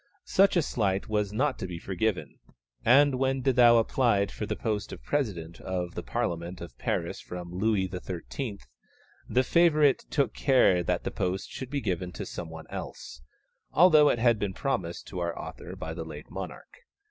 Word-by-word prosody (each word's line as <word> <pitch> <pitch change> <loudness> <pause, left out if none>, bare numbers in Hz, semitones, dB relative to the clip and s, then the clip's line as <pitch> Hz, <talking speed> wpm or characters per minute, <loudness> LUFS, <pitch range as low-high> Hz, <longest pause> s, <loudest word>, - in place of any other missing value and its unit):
Such 195 0 +4
a 170 - +3
slight 100 -7 -1
was 105 -2 0
not 130 +5 0
to 95 - -3
be 90 -2 -6
forgiven, 90 -4 -2 0.4
and 135 +2 +5
when 135 0 +1
De 135 0 +3
Thou 120 -1 +7
applied 115 -4 +2
for 105 - -5
the - - -2
post 105 -3 -2
of - - -9
President 90 - -2
of 90 -2 -3
the - - -4
Parliament 85 +1 -3
of 85 - -9
Paris - - -2
from 90 -1 -7
Louis 95 0 +1
XIII., 95 +5 -5 0.7
the 130 - +3
favourite 155 -1 +4
took 140 -7 +1
care 125 -10 +4
that 85 - -1
the - - -3
post 95 +1 -2
should 130 - -6
be 140 0 -2
given 90 -3 -2
to - - -5
some 85 -2 -6
one 80 -1 -9
else, - - -7 0.5
although 155 -3 +7
it - - +2
had 115 -1 +3
been 100 -3 -2
promised 95 -11 -2
to 90 - -5
our 85 -1 -2
author - - -8
by 80 - -5
the 80 - -5
late 75 -2 -10
monarch. 95 - -8
105 Hz, 180 wpm, -28 LUFS, 90-130 Hz, 0.7 s, Thou